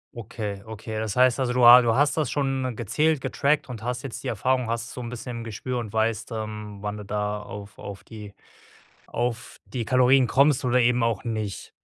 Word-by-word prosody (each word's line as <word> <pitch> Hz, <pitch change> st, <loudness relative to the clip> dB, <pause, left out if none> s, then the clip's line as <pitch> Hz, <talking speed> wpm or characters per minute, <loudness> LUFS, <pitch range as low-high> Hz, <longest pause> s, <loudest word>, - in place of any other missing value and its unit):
Okay, 105 Hz, -3 st, -6 dB
okay, 110 Hz, 0 st, -6 dB
das 110 Hz, -2 st, -3 dB
heißt 125 Hz, +1 st, +4 dB
also, 125 Hz, -2 st, 0 dB
du 125 Hz, -1 st, +4 dB
ha 125 Hz, +1 st, +11 dB
du 115 Hz, -1 st, +2 dB
hast 145 Hz, +3 st, +3 dB
das 150 Hz, -6 st, 0 dB
schon 135 Hz, -3 st, -1 dB
gezählt, 145 Hz, +8 st, +1 dB
getrackt 140 Hz, +1 st, 0 dB
und 115 Hz, -3 st, -7 dB
hast 125 Hz, +1 st, -3 dB
jetzt 135 Hz, -, -6 dB
die -, -, -2 dB
Erfahrung, 125 Hz, +3 st, 0 dB
hast 115 Hz, +2 st, -3 dB
so 125 Hz, -, -6 dB
'n 120 Hz, -, -5 dB
bisschen 125 Hz, 0 st, -6 dB
im -, -, -6 dB
Gespür 120 Hz, +3 st, -4 dB
und 110 Hz, -3 st, -6 dB
weißt, 110 Hz, +1 st, -1 dB
ähm, 105 Hz, -2 st, -5 dB
wann 105 Hz, 0 st, -4 dB
du 105 Hz, -, -7 dB
da 105 Hz, 0 st, -2 dB
auf 105 Hz, 0 st, -9 dB
auf 100 Hz, -1 st, -8 dB
die 105 Hz, -3 st, -10 dB, 0.7 s
auf 120 Hz, -1 st, -3 dB
die 120 Hz, -3 st, -4 dB
Kalorien 130 Hz, +1 st, +4 dB
kommst 140 Hz, +2 st, +3 dB
oder 125 Hz, 0 st, +3 dB
eben 125 Hz, 0 st, +3 dB
auch 115 Hz, 0 st, 0 dB
nicht. 110 Hz, -4 st, -4 dB
115 Hz, 210 wpm, -25 LUFS, 110-125 Hz, 0.7 s, ha